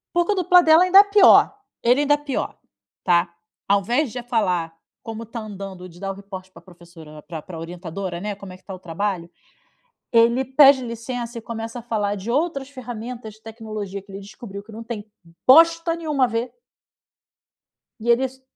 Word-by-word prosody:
O 345 - +3
dupla 360 -2 +4
dela 320 +1 +6
ainda 375 +2 +6
é - - +7
pior, 405 0 +6 0.3
ele 245 +4 +4
ainda 290 0 +4
é - - +2
pior, 290 -2 -4 0.5
tá! 175 -1 +2 0.4
Ao 200 0 +4
invés 240 - 0
de 245 - -5
falar 180 -9 -1 0.3
como 225 0 -6
está 230 +1 -8
andando, 195 -3 -8
e - - -11
de 175 +1 -16
dar 195 -1 -3
o - - -4
report 190 -1 -10
pra - - -15
professora, 170 -4 -15
né, 150 - -11
pra 160 -3 -7
pra 165 0 -10
orientadora, 175 +1 -6
né, 205 0 -3
como 195 -2 -11
é - - -11
que - - -26
tá 195 - -8
o - - -9
trabalho. 180 0 -3 0.8
Ele 235 +3 +4
pede 270 -1 +6
licença 235 0 -5
e - - -13
começa 230 +1 -6
a - - -9
falar 210 -3 -2
de 200 +4 -7
outras 280 0 -1
ferramentas 240 -3 -8
de 215 - -21
tecnologia 215 -3 -7
que 195 0 -17
ele 195 - -7
descobriu 200 0 -10
que 220 - -15
não 225 +1 -8
tem 215 -2 -7 0.4
bosta 330 +4 +6
nenhuma 300 -6 +1
a - - -1
ver 230 +2 -3 1.5
e 235 - -5
eles 260 +2 +1
225 Hz, 195 wpm, -22 LUFS, 195-260 Hz, 1.5 s, é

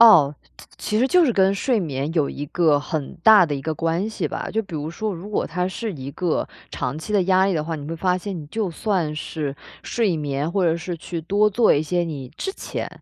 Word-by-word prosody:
哦， 160 -11 +8 0.2
其 - - -13
其 215 - -1
实 255 - +4
就 360 +3 +5
是 255 - +2
跟 195 -1 +3
睡 240 +3 +1
眠 145 -3 -2
有 150 -4 +2
一 145 - -5
个 155 -2 +3
很 150 0 -4
大 210 -3 +8
的 150 - -2
一 135 - -5
个 160 - -2
关 165 +6 0
系 - - -2
吧。 - - -4
就 225 - +1
比 190 -5 -10
如 155 +1 -3
说， 210 +3 -3
如 185 +5 -8
果 210 - 0
它 180 +3 -1
是 215 +2 -4
一 135 0 -6
个 175 +1 -1 0.2
长 135 +3 -3
期 210 +7 -6
的 205 -2 +4
压 185 +1 +4
力 195 - +1
的 155 - 0
话， 160 +1 -3
你 145 - -7
会 165 - -3
发 180 +2 +1
现 195 +1 -5
你 150 - -8
就 210 -1 -2
算 170 -4 -1
是 150 -2 -4 0.3
睡 210 -8 0
眠， 145 +1 -2
或 190 +1 +1
者 165 -1 +3
是 175 +1 -5
去 165 +1 -5
多 205 +6 +3
做 220 +3 +4
一 145 - +2
些 175 +3 0
你 140 -6 -5
之 385 - -3
前， - - -5
170 Hz, 265 characters per minute, -23 LUFS, 155-200 Hz, 0.3 s, 哦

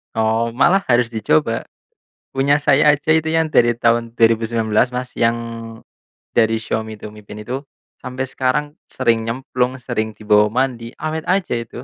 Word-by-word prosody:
Oh. 110 +1 0
Malah 180 +9 +3
harus 120 -1 +3
dicoba. 105 -9 0 0.6
Punya 140 +2 +1
saya 145 +1 +5
aja 150 +2 -4
itu 160 0 0
yang 160 -1 +1
dari 120 -4 +4
tahun 115 0 +1
2019, 115 0 +2
Mas, 125 0 -3
yang 115 0 +3 1.0
dari 115 -1 +3
Xiaomi 110 -1 -4
tuh, 105 0 -10
Mi 105 - -13
Band 105 +1 -10
itu. 130 +2 -3 0.4
Sampai 130 +1 -5
sekarang 130 +3 0 0.2
sering 115 -1 0
nyemplung, 125 +1 -2
sering 110 -3 -3
dibawa 105 0 +3
mandi, 120 0 -2
awet 155 +1 -4
aja 185 -6 +1
itu. 120 +1 -5
120 Hz, 150 wpm, -19 LUFS, 110-135 Hz, 1.0 s, saya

